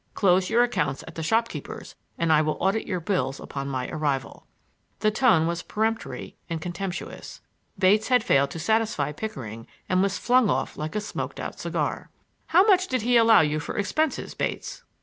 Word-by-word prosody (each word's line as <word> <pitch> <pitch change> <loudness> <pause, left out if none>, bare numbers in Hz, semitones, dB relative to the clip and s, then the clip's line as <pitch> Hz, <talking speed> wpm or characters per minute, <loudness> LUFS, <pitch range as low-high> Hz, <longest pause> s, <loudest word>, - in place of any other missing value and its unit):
"Close 185 -1 +3
your 235 +2 +4
accounts 140 - -1
at - - -9
the 165 - -5
shopkeepers' 225 +8 -2 0.2
and 165 -1 +2
I 155 - +5
will 155 0 -1
audit 195 +4 0
your 185 - -1
bills 145 -7 -1
on 140 0 -5
my 130 -2 -3
arrival." 145 -4 -3 0.5
The 215 -1 +3
tone 215 -8 +4
was 170 +1 -1
peremptory 220 +4 -3
and 165 -1 -2
contemptuous. 180 +3 -6 0.4
Bates 205 +3 +3
had 250 -3 +3
failed 140 - +3
to 165 - -7
satisfy 215 -7 +1
Pickering 130 - -7 0.2
and 185 0 +2
was 195 0 +1
flung 250 -3 +3
off 135 +1 -1
like 155 +4 -5
a 210 - 0
smoked 210 - -5
out - - -6
cigar. - - -2 0.4
"How 360 +3 +6
much 380 -5 +3
had 255 -4 0
he 245 +1 +2
allowed 230 -1 +7
you 155 0 0
for 150 - -5
expenses, 300 +9 -1
Bates?" - - -4
190 Hz, 180 wpm, -25 LUFS, 155-225 Hz, 0.5 s, allowed